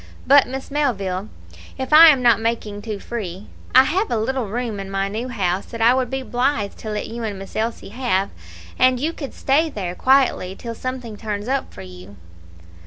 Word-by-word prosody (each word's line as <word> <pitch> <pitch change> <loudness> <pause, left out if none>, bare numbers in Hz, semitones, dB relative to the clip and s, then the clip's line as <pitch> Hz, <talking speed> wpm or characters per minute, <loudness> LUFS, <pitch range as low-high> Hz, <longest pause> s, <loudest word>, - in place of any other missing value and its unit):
But, 280 0 +6
Miss 265 +2 -6
Melville, 205 -9 -1 0.5
if 265 +2 -3
I 325 +2 +11
am 275 -5 +5
not 235 -2 +5
making 220 -3 -2
too 215 -1 -5
free, 200 -3 -6 0.3
I 260 - +9
have 375 +10 0
a 235 - 0
little 245 +1 -1
room 225 0 -3
in 195 0 -6
my 195 0 -1
new 220 +5 -4
house 195 -6 -1
that 230 - -8
I 230 +2 +5
would 255 -2 0
be 265 0 -3
blithe 245 -5 -1
to 220 - -7
let 210 -1 -3
you 235 +1 -6
and 210 -3 -3
Miss 195 0 -10
Elsie 225 -1 -3
have, 210 -4 -1 0.5
and 255 -1 +4
you 315 +5 -1
could 280 -5 -7
stay 305 +4 +2
there 190 - -4
quietly 255 -6 +2
till 230 +2 -7
something 250 -2 -6
turns 210 -1 -4
up 270 +1 -1
for 95 - -10
you." 90 +2 -12
230 Hz, 200 wpm, -21 LUFS, 200-260 Hz, 0.5 s, I